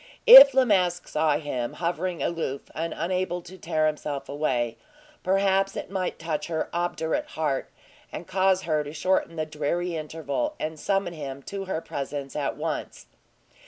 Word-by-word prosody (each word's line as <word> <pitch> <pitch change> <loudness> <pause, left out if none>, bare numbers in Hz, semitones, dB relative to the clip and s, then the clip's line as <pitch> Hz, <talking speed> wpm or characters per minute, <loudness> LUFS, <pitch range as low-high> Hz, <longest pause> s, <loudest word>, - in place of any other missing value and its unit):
If 465 - +11
La 265 -1 +5
Masque 180 -5 +1
saw 155 -1 +1
him 130 -6 -4
hovering 175 +1 -2
aloof 160 -5 -3
and 165 +1 -3
unable 180 +1 -2
to 185 - -12
tear 160 -3 -1
himself 150 -2 -3
away, 125 -6 -1 0.4
perhaps 195 +1 +1
it - - -6
might 185 -2 -2
touch 155 -2 -3
her 160 -2 -2
obdurate 170 -2 -1
heart, 145 -4 -1 0.4
and 170 - -7
cause 190 0 +2
her 155 -3 0
to 145 0 -8
shorten 170 +1 0
the 155 -1 -2
dreary 160 +3 -2
interval, 160 - -3
and 155 0 -4
summon 195 -1 -1
him 140 -3 -7
to 195 +4 -6
her 185 -4 -3
presence 140 -2 -5
at 145 -2 -2
once. - - -4
165 Hz, 160 wpm, -26 LUFS, 150-185 Hz, 0.4 s, If